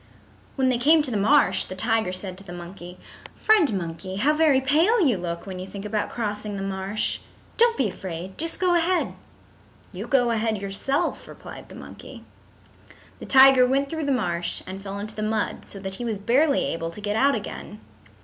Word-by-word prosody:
When 265 Hz, -2 st, +2 dB
they 250 Hz, -2 st, +1 dB
came 305 Hz, +5 st, +5 dB
to 270 Hz, -, -1 dB
the -, -, -2 dB
marsh 250 Hz, +9 st, +3 dB
the 185 Hz, -, -7 dB
tiger 220 Hz, -1 st, 0 dB
said 185 Hz, 0 st, -4 dB
to -, -, -12 dB
the 185 Hz, -, -11 dB
monkey, 175 Hz, 0 st, -9 dB, 0.4 s
"Friend 415 Hz, -, +3 dB
Monkey, 170 Hz, +2 st, -6 dB
how 270 Hz, +10 st, +2 dB
very 305 Hz, -3 st, +4 dB
pale 320 Hz, -, +3 dB
you 250 Hz, -6 st, +3 dB
look 170 Hz, -2 st, -5 dB
when 190 Hz, -2 st, -7 dB
you 185 Hz, -, -6 dB
think 195 Hz, +1 st, -8 dB
about 210 Hz, 0 st, -2 dB
crossing 210 Hz, -2 st, -3 dB
the 195 Hz, -, -4 dB
marsh. 195 Hz, +2 st, -1 dB, 0.4 s
Don't 465 Hz, 0 st, +4 dB
be 260 Hz, -, +2 dB
afraid. 185 Hz, 0 st, -7 dB
Just 330 Hz, +1 st, -4 dB
go 365 Hz, -1 st, +2 dB
ahead." 345 Hz, +1 st, +1 dB, 0.8 s
"You -, -, -6 dB
go 245 Hz, -4 st, +3 dB
ahead 220 Hz, -1 st, 0 dB
yourself," 200 Hz, +8 st, -2 dB
replied -, -, -11 dB
the -, -, -11 dB
monkey. -, -, -11 dB, 0.9 s
The -, -, -9 dB
tiger 265 Hz, -1 st, +7 dB
went 275 Hz, +2 st, +1 dB
through 320 Hz, -2 st, -3 dB
the 280 Hz, -, 0 dB
marsh 175 Hz, -9 st, -1 dB
and 190 Hz, +1 st, -7 dB
fell 195 Hz, 0 st, -6 dB
into 210 Hz, +2 st, -6 dB
the 215 Hz, -, -6 dB
mud 215 Hz, 0 st, -2 dB
so -, -, -9 dB
that 190 Hz, -1 st, -6 dB
he -, -, -2 dB
was 225 Hz, -3 st, -2 dB
barely 275 Hz, +8 st, +2 dB
able 165 Hz, 0 st, -3 dB
to 170 Hz, -, -8 dB
get 205 Hz, 0 st, -2 dB
out 275 Hz, +5 st, +3 dB
again. -, -, -7 dB
215 Hz, 195 wpm, -24 LUFS, 190-275 Hz, 0.9 s, tiger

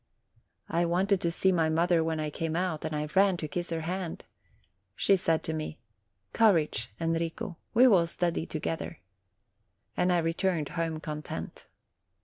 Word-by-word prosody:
I 170 Hz, -, +1 dB
wanted 185 Hz, +3 st, +2 dB
to 170 Hz, -, +1 dB
see 190 Hz, +3 st, +2 dB
my 165 Hz, -3 st, +2 dB
mother 165 Hz, +1 st, +3 dB
when 160 Hz, -1 st, -1 dB
I 155 Hz, -1 st, -2 dB
came 165 Hz, +1 st, -3 dB
out, 175 Hz, -3 st, -1 dB
and 155 Hz, -1 st, -3 dB
I 150 Hz, 0 st, -1 dB
ran 195 Hz, -1 st, +4 dB
to 155 Hz, -, -4 dB
kiss 175 Hz, +4 st, -4 dB
her 165 Hz, -1 st, -2 dB
hand! 175 Hz, +1 st, -4 dB, 0.7 s
She 200 Hz, -, +4 dB
said 165 Hz, -3 st, +1 dB
to 160 Hz, -, -3 dB
me: 155 Hz, 0 st, -4 dB, 0.6 s
"Courage, 160 Hz, -, +3 dB
Enrico! 165 Hz, +1 st, -2 dB, 0.2 s
we 250 Hz, +3 st, +8 dB
will 180 Hz, -8 st, +5 dB
study 170 Hz, -1 st, -1 dB
together." 160 Hz, +1 st, -4 dB, 1.0 s
And 180 Hz, 0 st, +2 dB
I 175 Hz, -, +4 dB
returned 165 Hz, -1 st, 0 dB
home 165 Hz, -2 st, -2 dB
content. 150 Hz, -, -6 dB
165 Hz, 155 wpm, -29 LUFS, 160-180 Hz, 1.0 s, we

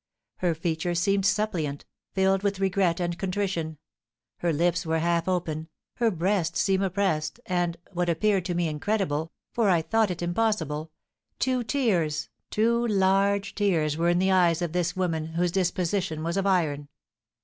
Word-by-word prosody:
Her 175 Hz, -3 st, 0 dB
features 170 Hz, +1 st, -1 dB
seemed 195 Hz, +1 st, +2 dB
suppliant, 190 Hz, -8 st, -1 dB, 0.3 s
filled 190 Hz, 0 st, +2 dB
with 200 Hz, -1 st, -1 dB
regret 190 Hz, -3 st, +1 dB
and 175 Hz, -1 st, -1 dB
contrition; 185 Hz, -5 st, -2 dB, 0.6 s
her 175 Hz, -, +1 dB
lips 175 Hz, +3 st, +1 dB
were 160 Hz, -1 st, 0 dB
half 170 Hz, +1 st, +1 dB
open, 165 Hz, -4 st, -1 dB, 0.3 s
her 235 Hz, -2 st, +3 dB
breast 175 Hz, -2 st, 0 dB
seemed 190 Hz, -1 st, +2 dB
oppressed, 190 Hz, -2 st, 0 dB
and 175 Hz, -2 st, -1 dB
what 175 Hz, -1 st, -1 dB
appeared 195 Hz, +3 st, +2 dB
to 180 Hz, -2 st, -2 dB
me 175 Hz, -1 st, +1 dB
incredible, 160 Hz, -1 st, -1 dB, 0.2 s
for 230 Hz, -4 st, +2 dB
I 170 Hz, -3 st, +3 dB
thought 220 Hz, +5 st, +2 dB
it 175 Hz, -1 st, -4 dB
impossible 175 Hz, -5 st, -1 dB, 0.5 s
two 255 Hz, -1 st, 0 dB
tears, 185 Hz, -, 0 dB, 0.2 s
two 235 Hz, +2 st, +2 dB
large 200 Hz, 0 st, +2 dB
tears, 165 Hz, -8 st, +1 dB
were 170 Hz, +2 st, +1 dB
in 175 Hz, -, +3 dB
the 190 Hz, +1 st, +2 dB
eyes 175 Hz, -2 st, +3 dB
of 170 Hz, -, -2 dB
this 180 Hz, 0 st, 0 dB
woman, 160 Hz, -3 st, -2 dB
whose 175 Hz, +1 st, +1 dB
disposition 180 Hz, -2 st, -1 dB
was 170 Hz, +2 st, -1 dB
of 195 Hz, 0 st, +1 dB
iron! 150 Hz, -7 st, +1 dB
180 Hz, 160 wpm, -26 LUFS, 165-195 Hz, 0.6 s, her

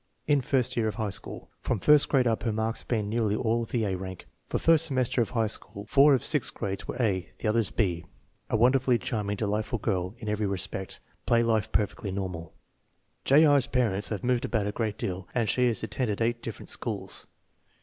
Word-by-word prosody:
In 145 Hz, -2 st, +3 dB
first 130 Hz, 0 st, 0 dB
year 115 Hz, -2 st, +1 dB
of 110 Hz, -, -3 dB
high 110 Hz, -2 st, -2 dB
school. -, -, -5 dB
From 120 Hz, -, -2 dB
first 150 Hz, +6 st, +5 dB
grade 130 Hz, -3 st, +3 dB
up 115 Hz, -2 st, +1 dB
her 115 Hz, -, -1 dB
marks 110 Hz, +1 st, -1 dB
have -, -, -12 dB
been 110 Hz, -4 st, 0 dB
nearly 110 Hz, -1 st, 0 dB
all 115 Hz, +1 st, 0 dB
of 115 Hz, -, -5 dB
the 115 Hz, -3 st, 0 dB
A 95 Hz, -2 st, -1 dB
rank. 95 Hz, 0 st, -7 dB, 0.2 s
For -, -, 0 dB
first 165 Hz, -1 st, +4 dB
semester 130 Hz, -4 st, 0 dB
of 115 Hz, -, 0 dB
high 115 Hz, -3 st, +1 dB
school 100 Hz, -1 st, -5 dB
four 140 Hz, +5 st, +6 dB
of 130 Hz, -, -2 dB
six 145 Hz, -5 st, +2 dB
grades 100 Hz, -3 st, -5 dB
were -, -, -4 dB
A, 95 Hz, -7 st, 0 dB
the -, -, -3 dB
others 110 Hz, -1 st, +2 dB
B. 90 Hz, -6 st, -1 dB, 0.4 s
A -, -, +1 dB
wonderfully 125 Hz, +1 st, +4 dB
charming, 105 Hz, -4 st, -2 dB
delightful 105 Hz, +3 st, -1 dB
girl 95 Hz, -2 st, -2 dB
in 115 Hz, -, -8 dB
every 105 Hz, 0 st, 0 dB
respect. 95 Hz, 0 st, -3 dB, 0.3 s
Play 115 Hz, 0 st, +4 dB
life 110 Hz, -2 st, +1 dB
perfectly 100 Hz, -1 st, -1 dB
normal. 90 Hz, -4 st, -5 dB, 0.7 s
J. 150 Hz, +4 st, +6 dB
R.'s 145 Hz, -4 st, +4 dB
parents 110 Hz, -6 st, +1 dB
have 105 Hz, -4 st, -4 dB
moved 125 Hz, -1 st, +1 dB
about 110 Hz, -4 st, 0 dB
a 105 Hz, -, -1 dB
great 110 Hz, -1 st, -2 dB
deal 90 Hz, -3 st, -4 dB
and 115 Hz, -3 st, +1 dB
she 125 Hz, +4 st, +3 dB
has 115 Hz, -, 0 dB
at -, -, -4 dB
tended 110 Hz, -6 st, -1 dB
eight 120 Hz, +1 st, 0 dB
different 115 Hz, -, -7 dB
schools. 100 Hz, -5 st, -2 dB
110 Hz, 215 wpm, -27 LUFS, 100-125 Hz, 0.7 s, four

